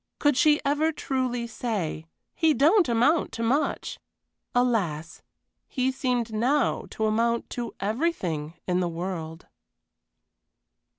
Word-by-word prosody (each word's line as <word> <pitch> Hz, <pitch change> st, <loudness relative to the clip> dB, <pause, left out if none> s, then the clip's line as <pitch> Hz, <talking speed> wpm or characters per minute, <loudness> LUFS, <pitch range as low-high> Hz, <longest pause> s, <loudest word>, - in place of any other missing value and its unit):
Could 290 Hz, -2 st, +3 dB
she 300 Hz, +1 st, +4 dB
ever 295 Hz, +3 st, +2 dB
truly 255 Hz, -5 st, -2 dB
say, 205 Hz, -9 st, -3 dB, 0.3 s
"He 320 Hz, -2 st, +3 dB
don't 320 Hz, -, +4 dB
amount 250 Hz, +8 st, +3 dB
to 230 Hz, -, -3 dB
much!" 270 Hz, +7 st, 0 dB, 0.6 s
Alas! 195 Hz, -11 st, 0 dB, 0.5 s
he 260 Hz, -1 st, 0 dB
seemed 250 Hz, -4 st, -1 dB
now 255 Hz, +5 st, +1 dB
to 220 Hz, -, -2 dB
amount 230 Hz, +2 st, 0 dB
to 240 Hz, -1 st, -5 dB
everything 195 Hz, -, -2 dB
in 180 Hz, 0 st, +1 dB
the 175 Hz, -1 st, 0 dB
world. 165 Hz, -2 st, -5 dB
235 Hz, 115 wpm, -26 LUFS, 190-280 Hz, 0.6 s, she